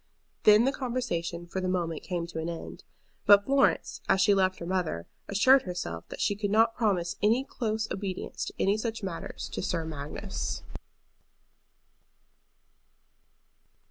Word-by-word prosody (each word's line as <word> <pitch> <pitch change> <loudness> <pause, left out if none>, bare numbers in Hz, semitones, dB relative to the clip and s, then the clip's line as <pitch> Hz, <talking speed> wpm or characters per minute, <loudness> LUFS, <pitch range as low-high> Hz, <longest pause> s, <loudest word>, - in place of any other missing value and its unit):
Then 215 +2 +7
the 270 - +3
conversation 205 - -3
for 185 +2 -4
the 185 - -1
moment 170 -4 -1
came 175 -2 -3
to 170 -1 -6
an 160 +1 -3
end. 170 - -7 0.4
But 200 0 +8
Florence, 275 0 +2
as 190 - +4
she 200 +2 +5
left 190 -1 +2
her 170 - -7
mother, 175 - -1 0.2
assured 255 +7 +5
herself 175 - -5
that - - -8
she 205 - +1
could 205 0 -2
not 225 +2 +4
promise 185 -7 0
any 230 +5 +3
close 220 -5 -2
obedience 190 -1 -4
in - - 0
any 200 +2 +3
such 225 0 -3
matters 185 -4 -5
to - - -4
Sir 165 -2 -1
Magnus. 150 -2 -5
195 Hz, 145 wpm, -29 LUFS, 170-220 Hz, 0.4 s, But